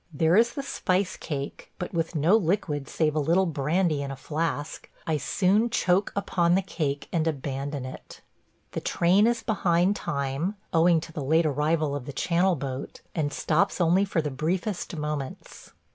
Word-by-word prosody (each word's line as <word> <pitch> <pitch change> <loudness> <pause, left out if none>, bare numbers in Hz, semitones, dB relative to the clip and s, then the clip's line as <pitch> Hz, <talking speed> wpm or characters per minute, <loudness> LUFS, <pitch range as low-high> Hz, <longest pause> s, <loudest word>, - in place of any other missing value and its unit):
There 160 +3 +2
is 235 +3 +4
the 280 - -4
spice 185 -7 0
cake, 140 -3 -6
but 180 - -5
with 165 0 -1
no 160 +7 +4
liquid 165 -8 0
save 155 -2 +1
a - - +2
little 170 +6 +3
brandy 155 0 0
in 140 - -4
a 135 - -4
flask, 150 +2 -3 0.2
I 160 -2 +1
soon 200 - +2
choke 185 -2 +2
upon 175 -3 +2
the 195 - +2
cake 145 -6 -3
and 165 -2 +1
abandon 140 -2 -3
it. 130 - -10 0.5
The - - -4
train 190 +6 +3
is 235 -1 0
behind 185 -2 +2
time, 140 +5 -2 0.2
owing 165 0 +4
to 165 0 -10
the 150 - -4
late 160 +4 +3
arrival 150 0 +1
of 135 -3 -6
the 140 - -5
Channel 175 +5 +2
boat, 135 -2 -6
and 150 -4 -1
stops 170 +8 +1
only 175 +3 +4
for 180 -5 0
the 150 - -2
briefest 175 +7 -2
moments. 150 -3 -5
165 Hz, 175 wpm, -26 LUFS, 145-185 Hz, 0.5 s, is